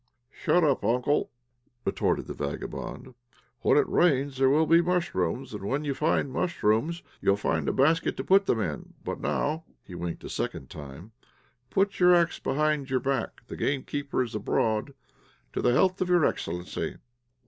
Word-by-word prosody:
"Shut 175 +4 +2
up, 140 -7 +2
uncle," 125 +7 +1 0.6
retorted - - 0
the - - -6
vagabond. 75 - -5 0.5
"When - - +4
it - - +4
rains 140 -5 +2
there 135 0 +5
will 155 +4 +4
be 165 +2 +5
mushrooms, 170 - -1
and - - -6
when 135 +9 -1
you 145 -2 -1
find 140 -1 0
mushrooms 170 0 0 0.2
you - - +1
will 100 - +4
find 80 -7 0
a - - +2
basket 155 +5 +2
to - - -3
put 195 +1 +4
them 115 - +2
in. 85 -9 -4
But - - -4
now" 155 +3 -1 0.2
(he 90 - -11
winked 85 -1 -5
a - - -7
second 65 - -4
time) 75 +8 -10 0.6
"put 195 +4 +1
your 180 0 +7
axe 170 -1 +2
behind 150 -1 0
your 130 0 +1
back, 135 -3 -2
the - - -8
gamekeeper 140 0 -1
is 120 -2 -7
abroad. 110 +4 0 0.6
To - - -1
the 120 - +3
health 185 +6 +2
of 180 - 0
your 175 -3 +4
excellency." 90 +1 -3
140 Hz, 170 wpm, -27 LUFS, 105-165 Hz, 0.6 s, your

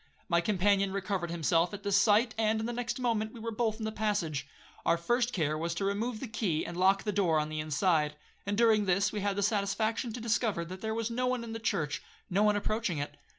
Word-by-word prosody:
My 170 -1 +3
companion 195 +1 +2
recovered 195 -3 -2
himself 170 +2 +1
at 200 - -11
the 200 - -1
sight, 210 +3 +4
and 220 0 +1
in 220 - -2
the 240 - -3
next 245 +1 -3
moment 225 -3 0
we 235 - -10
were 230 +1 -4
both 220 -1 0
in 220 - -4
the 220 - -2
passage. 205 -9 -1 0.4
Our 170 - +3
first 240 +8 +1
care 155 -8 0
was 165 +2 -2
to 195 - -1
remove 215 +4 -1
the 265 - -4
key, 205 -7 -1
and 170 - -6
lock 190 +2 +3
the 210 - -1
door 180 -6 +2
on 150 0 -2
the 155 0 -4
inside; 155 0 +1 0.3
and 200 0 -2
during 220 -3 +4
this, 195 +1 +2
we 210 - -3
had 200 0 0
the 200 - 0
satisfaction 220 +3 0
to 245 - -5
discover, 220 -6 0
that 185 +2 -8
there 220 0 -2
was 230 0 -2
no 250 +2 0
one 250 -1 0
in 225 -1 -6
the 225 - -4
church, 160 -10 -1 0.3
no 195 +3 +2
one 210 0 +4
approaching 205 -3 -1
it. 145 0 -4
205 Hz, 240 wpm, -30 LUFS, 175-225 Hz, 0.4 s, sight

